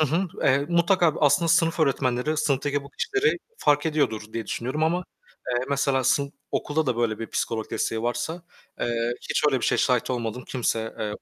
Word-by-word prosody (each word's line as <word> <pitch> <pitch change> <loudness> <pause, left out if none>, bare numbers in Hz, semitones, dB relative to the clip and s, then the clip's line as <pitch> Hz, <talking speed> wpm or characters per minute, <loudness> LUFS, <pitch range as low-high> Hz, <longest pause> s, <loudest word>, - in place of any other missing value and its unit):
Hı - - +5
hı, 170 +7 0
eee, 140 +1 +3
mutlaka, 170 -1 +3
bu 155 - 0
aslında 145 +4 +4
sınıf 165 0 +3
öğretmenleri 135 0 +1
sınıftaki 145 -1 0
bu 140 - -13
kişileri 405 - 0 0.2
fark 145 - +2
ediyordur 110 -9 -1
diye 115 -2 -4
düşünüyorum 130 +9 -3
ama, 175 +3 0 0.4
eee, 125 0 0
mesela 140 -2 +1
sın 140 +2 +2 0.2
okulda 155 +1 -1
da 125 -3 0
böyle 115 -3 0
bir 115 - -4
psikolog 110 -1 -2
desteği 110 -1 -1
varsa, 120 +9 -2 0.4
eee, 120 0 0 0.2
hiç - - +1
öyle 140 -3 +3
bir - - -1
şeye - - +2
şahit 125 -2 +1
olmadım. 120 0 -3
Kimse, 115 -3 -1
eee. 105 -1 -2
140 Hz, 185 wpm, -25 LUFS, 120-155 Hz, 0.4 s, Hı